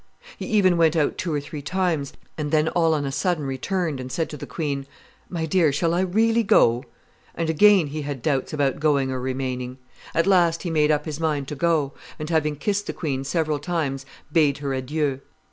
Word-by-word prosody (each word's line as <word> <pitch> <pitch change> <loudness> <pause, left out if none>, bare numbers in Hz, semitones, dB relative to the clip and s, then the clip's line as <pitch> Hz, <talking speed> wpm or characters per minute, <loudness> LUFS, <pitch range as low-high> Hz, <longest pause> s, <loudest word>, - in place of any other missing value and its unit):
He - - -6
even 190 -5 +3
went 165 -1 +4
out 155 -3 +1
two 175 - -2
or 150 - 0
three 145 +1 -7
times, 165 -2 -1 0.2
and 150 -2 -3
then 155 +1 +2
all 165 -2 +2
on 145 -2 -1
a 135 - -2
sudden 165 +1 0
returned, 150 +3 -2
and 130 0 -6
said 160 +2 -2
to - - -5
the - - -8
queen, 140 -4 -3 0.4
'My 165 -3 -2
dear, 160 -1 +3
shall 165 +4 0
I 175 - +1
really 225 +5 +2
go?' 120 - +4 0.5
and 165 -1 0
again 195 +2 +6
he 150 +2 -5
had 140 -4 -5
doubts 135 -4 0
about 145 -3 0
going 140 -3 +2
or 130 - -2
remaining. 130 -1 -3 0.4
At 165 - +3
last 175 -4 +3
he 175 - -2
made 155 -2 +3
up 150 -1 +1
his 155 -2 -5
mind 150 -4 -1
to 150 - -4
go, 150 -2 +1 0.2
and, 155 +2 -5
having 150 -2 +1
kissed 205 +7 -1
the - - -3
queen 135 -5 -3
several 155 0 0
times, 145 -4 -2 0.2
bade 150 -3 +3
her 140 -2 -3
adieu. 135 +1 -1
150 Hz, 210 wpm, -24 LUFS, 140-170 Hz, 0.5 s, again